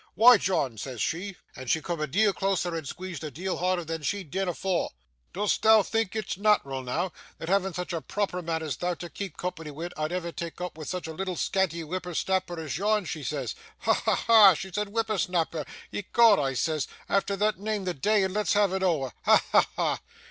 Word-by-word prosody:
"Why, 245 +2 +8
John," 135 - 0
says 125 0 -6
she 185 - -2 0.2
and 130 -1 -7
she 160 - +3
coom 170 0 -4
a 155 - 0
deal 205 +8 +3
closer 190 -3 0
and 160 -4 -4
squeedged 185 +3 -6
a 155 - -3
deal 180 +7 -3
harder 180 -1 0
than 165 0 -4
she'd 185 0 -3
deane 195 0 -1
afore 180 +1 -1 0.4
"dost 205 +2 0
thou 220 -1 +7
think 225 -1 -1
it's 215 -4 -3
nat'ral 190 -11 +2
noo, 165 +9 -2 0.3
that 165 - -6
having 190 -2 +1
such 180 0 -4
a 165 - -2
proper 195 -1 -2
mun 165 -1 -2
as 155 - -3
thou 180 0 -1
to 175 0 -8
keep 195 -6 -6
company 165 -3 -4
wi', 160 +4 -5
I'd 155 +1 -2
ever 175 -1 -2
tak' 170 0 -6
opp 180 -2 -4
wi' 155 -1 -8
such 180 0 -4
a 160 - -5
leetle 185 +2 -3
scanty 170 -2 0
whipper 180 +2 -5
snapper 185 -2 0
as 155 -1 -4
yon?" 210 0 +2
she 160 -1 -4
says. 135 -4 -3 0.3
Ha! - - +3
ha! - - +1
ha! 220 -4 +9
She 190 +5 -6
said 210 +1 -1
whipper 220 -1 -1
snapper! 165 -3 0 0.3
"Ecod!" 215 +1 +4
I 135 -2 0
says, 155 +1 0 0.2
"efther 200 0 +1
thot, 210 0 +1
neame 210 -1 -2
the 180 - -1
day, 205 +8 +2
and 190 -1 -1
let's 210 0 +1
have 205 -2 +3
it 190 - -1
ower!" 150 - +1
Ha! - - +5
ha! - - +5
ha! - - 0
180 Hz, 220 wpm, -27 LUFS, 160-200 Hz, 0.4 s, ha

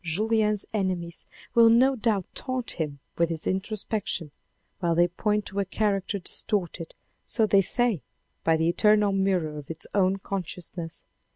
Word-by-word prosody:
Julien's 210 +4 +1
enemies 180 -4 -2 0.3
will 230 -2 +7
no 255 +4 +5
doubt 215 -6 0
taunt 255 -2 -2
him 150 -4 -3 0.2
with 170 -1 +3
his 165 -2 -4
introspection, 190 -4 -2 0.5
while 170 -3 +1
they 175 +1 +5
point 210 +4 -1
to 200 - -4
a - - +3
character 200 0 0
distorted, 180 -3 -2 0.3
so 225 - +1
they 200 -2 +5
say, 230 - +1 0.4
by 165 0 +3
the 160 +1 +1
eternal 210 +3 +4
mirror 185 -6 0
of 140 - -12
its 165 -1 -5
own 195 -1 +3
conscious 185 -3 -5
ness. 165 -2 -7
195 Hz, 155 wpm, -26 LUFS, 170-215 Hz, 0.5 s, will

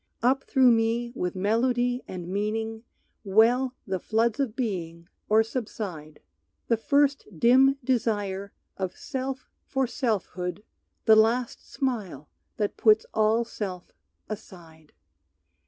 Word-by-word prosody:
"Up 265 +2 +3
through 260 -3 +5
me, 230 +1 +1
with 180 -4 -2
melody 245 +5 +1
and 180 -2 -6
meaning, 220 +3 -2 0.4
Well 235 +6 +3
the 190 -3 -2
floods 225 +4 0
of 255 -6 -1
being 170 -9 -4 0.2
or 220 +1 +5
subside, 200 - -6 0.5
The 230 - +4
first 280 +5 +1
dim 265 - +5
desire 205 -6 -1 0.3
of 190 -2 -4
self 265 -1 -5 0.2
for 270 0 0
selfhood, 205 - -2 0.4
The 220 - +7
last 230 +3 +1
smile 205 - -3 0.3
that 210 -2 -2
puts 215 -1 +4
all 220 +2 +2
self 190 -6 -6 0.4
aside. 170 -7 -11
220 Hz, 115 wpm, -26 LUFS, 195-245 Hz, 0.5 s, The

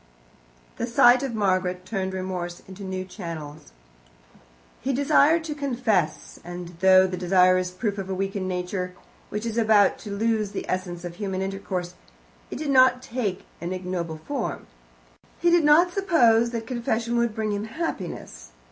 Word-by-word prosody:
The 235 - -2
sight 245 +1 +6
of 265 -4 -3
Margaret 185 -3 0
turned 190 -1 -3
remorse 180 -2 -4
into 190 +1 -11
new 185 -1 -4
channels. 160 - -8 1.1
He 270 +2 -1
desired 305 +4 +4
to 315 -2 -4
confess, 245 - -1
and 175 0 -7
though 190 0 +6
the 185 -1 -3
desire 185 0 +4
is 180 0 -2
proof 200 +3 -3
of 195 -1 -5
a 190 - -1
weakened 195 0 -2
nature, 180 0 -3 0.3
which 210 +2 -4
is 230 0 -1
about 215 -3 +4
to 215 - -9
lose 215 0 0
the - - -5
essence 180 -1 -3
of 175 0 -7
human 190 -2 -2
intercourse, 190 -2 -4 0.6
it - - -6
did 295 0 -2
not 255 -1 +5
take 225 -6 -3 0.2
an 175 +2 -3
ignoble 180 -3 -4
form. 255 - -4 0.7
He 345 - +3
did 345 -2 +5
not 330 +4 +5
suppose 240 - +4
that 230 -1 -4
confession 235 -1 -1
would 235 -2 +1
bring 215 -2 -1
him 205 +1 -2
happiness. 180 - -6
195 Hz, 160 wpm, -25 LUFS, 185-235 Hz, 1.1 s, sight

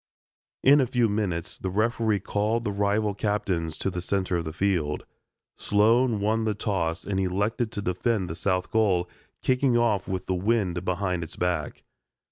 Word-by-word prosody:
In 140 +2 +7
a 130 - +1
few 120 -1 +2
minutes 100 -6 -2
the 95 - -3
referee 110 0 +1
called 110 +4 0
the 105 - -1
rival 100 +1 +1
captains 95 -6 -1
to 95 - -2
the 90 - -4
center 95 0 -1
of 85 - -3
the 80 - -4
field. 85 -4 -1 0.5
Sloan 115 +2 +3
won 110 +2 +1
the 110 -1 0
toss 95 -5 -1
and 100 -2 -2
elected 105 +5 0
to 100 - -4
defend 95 +2 0
the 80 - -4
south 90 +2 -1
goal, 95 -6 +2 0.4
kicking 130 -1 +2
off 110 -5 +1
with 95 -1 -3
the 95 - -1
wind 90 -2 0
behind 90 -1 -1
its 80 - -8
back. 85 -5 -2
100 Hz, 170 wpm, -26 LUFS, 90-110 Hz, 0.5 s, In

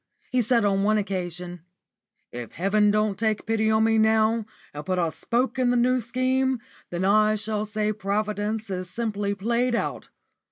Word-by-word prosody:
He 255 - +3
said 235 -1 +2
on 195 -1 +2
one 215 +2 +3
occasion: 180 -3 -4 0.7
"If 120 -1 -7
heaven 210 +3 +2
don't 210 -1 +1
take 220 -1 0
pity 220 -1 +1
on 220 0 +3
me 225 0 +3
now, 220 0 +2 0.3
and 145 0 -6
put 185 +1 -1
a 170 -2 +1
spoke 250 +7 -1
in 250 -1 +3
the 245 - +2
New 255 +1 +3
Scheme, 255 +2 0 0.3
then 175 +2 -2
I 215 +2 +4
shall 210 0 -2
say 215 0 -1
Providence 210 +1 -2
is 185 -1 -4
simply 205 -2 -2
played 235 +4 0
out. - - -3
215 Hz, 170 wpm, -25 LUFS, 200-230 Hz, 0.7 s, I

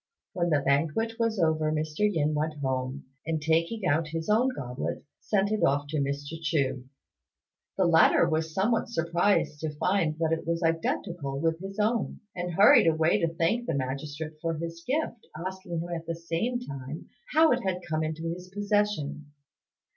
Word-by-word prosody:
When 175 -2 0
the 150 -3 +3
banquet 165 - +1
was 230 -1 +1
over, 160 -3 +2
Mr. 155 0 -3
Yin 155 -4 +1
went 155 +1 -1
home, 130 -1 -3 0.2
and 160 0 -1
taking 165 +7 0
out 160 -1 +2
his 165 +5 -2
own 240 +5 +4
goblet, 130 - -4
sent 200 -1 +1
it 215 - 0
off 145 +1 +3
to 155 - -2
Mr. 145 +3 -3
Chu. 140 -5 0 0.9
The 190 - +3
latter 170 0 +5
was 160 0 0
somewhat 215 +9 +1
surprised 170 -4 +1
to 155 -1 -4
find 170 -3 +1
that 160 -1 0
it 165 - -3
was 170 +1 0
identical 165 -3 -1
with 165 +1 0
his 195 +2 -7
own, 220 +2 0
and 175 -1 -3
hurried 220 - +7
away 160 +1 +3
to 165 - +2
thank 225 +10 +1
the - - 0
magistrate 145 +4 -4
for 165 -1 -1
his 165 +1 -6
gift, 270 -5 -2
asking 180 -1 -4
him 175 - -6
at 165 -1 -5
the 165 - -2
same 170 +9 -2
time 140 - -7 0.3
how 315 0 +6
it 250 0 +2
had 185 -2 -1
come 155 -1 0
into 155 +1 -3
his 180 +1 -10
possession. 205 -8 -1
165 Hz, 175 wpm, -28 LUFS, 155-190 Hz, 0.9 s, hurried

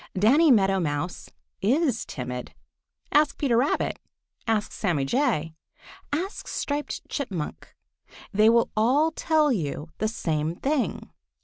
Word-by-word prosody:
Danny 275 - +5
Meadow 195 -6 +4
Mouse 155 +1 -3 0.3
is 255 - +1
timid. 125 -1 -6 0.6
Ask 295 0 +3
Peter 265 -5 +1
Rabbit. 255 +5 +1 0.5
Ask 220 -2 0
Sammy 165 -9 0
Jay. 180 - 0 0.6
Ask 360 +8 -3
Striped 290 +1 -3
Chipmunk. 195 - -5 0.6
They 215 +2 +5
will 235 0 +3
all 265 +9 +3
tell 310 -2 +2
you 155 - -2
the 215 - +1
same 160 -7 -2
thing. 270 - -2
225 Hz, 115 wpm, -26 LUFS, 170-285 Hz, 0.6 s, Danny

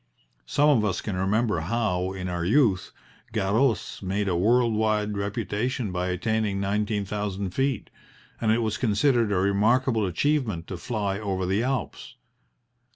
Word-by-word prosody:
Some 145 - +3
of 135 -8 +4
us 95 -4 0
can 105 - -4
remember 100 +1 +1
how, 95 0 -1
in 95 -1 -5
our 90 -1 -2
youth, 100 -2 +2 0.4
Garros 110 +2 0
made 100 +1 -1
a 90 - +1
world 115 +6 +3
wide 105 -1 0
reputation 105 +3 -2
by 90 0 -2
attaining 105 +2 -1
nineteen 105 +1 -1
thousand 100 -1 -3
feet, 135 0 -1 0.5
and 110 -2 +2
it 115 +1 +2
was 110 0 -1
considered 115 0 +2
a - - +1
remarkable 110 +4 +2
achievement 110 - 0
to 95 - -4
fly 100 -1 -2
over 95 -3 -2
the 95 +4 +1
Alps. 130 0 -3
105 Hz, 150 wpm, -26 LUFS, 95-115 Hz, 0.5 s, of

